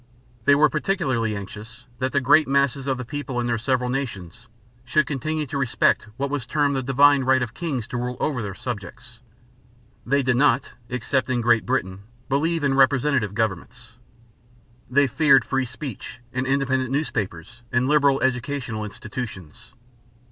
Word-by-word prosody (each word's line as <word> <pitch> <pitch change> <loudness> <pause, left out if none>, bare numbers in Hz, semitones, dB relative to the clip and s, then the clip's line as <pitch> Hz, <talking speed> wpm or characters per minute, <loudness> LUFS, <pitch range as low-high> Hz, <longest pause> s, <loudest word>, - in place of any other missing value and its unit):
They 140 - +6
were 150 +2 +5
particularly 145 - -1
anxious 105 +4 -9
that 130 0 -1
the 140 - +2
great 150 +4 +4
masses 140 0 +1
of 135 -1 0
the 130 - -6
people 135 -1 -4
in 120 - -1
their 120 -1 0
several 125 +1 0
nations 120 -5 -5 0.4
should 140 +4 +2
continue 155 +2 -2
to 140 0 -4
respect 125 -4 +1
what 140 0 -2
was 140 -5 -3
termed 145 +1 +1
"the 135 - 0
divine 140 +2 +4
right 130 0 +3
of 120 -2 -6
kings 140 -9 -3
to 125 - -3
rule 125 +1 -3
over 140 -6 -1
their 100 -3 -5
subjects." 120 +2 -7 0.8
They 140 +3 +1
did 125 -1 +1
not, 140 -2 +2 0.2
except 130 +2 -1
in 125 -1 +1
Great 115 -1 +2
Britain, 100 -7 -1 0.3
believe 160 +4 0
in 140 -1 +2
representative 135 -5 +2
governments. 115 +3 -4 0.9
They 140 +3 +4
feared 140 0 +4
free 135 -1 0
speech 125 -1 -8
and 130 +1 -2
independent 130 -1 +1
newspapers 120 - -3
and 120 +1 +1
liberal 140 -2 +3
educational 125 -3 -2
institutions. 105 -2 -8
130 Hz, 160 wpm, -23 LUFS, 120-140 Hz, 0.9 s, They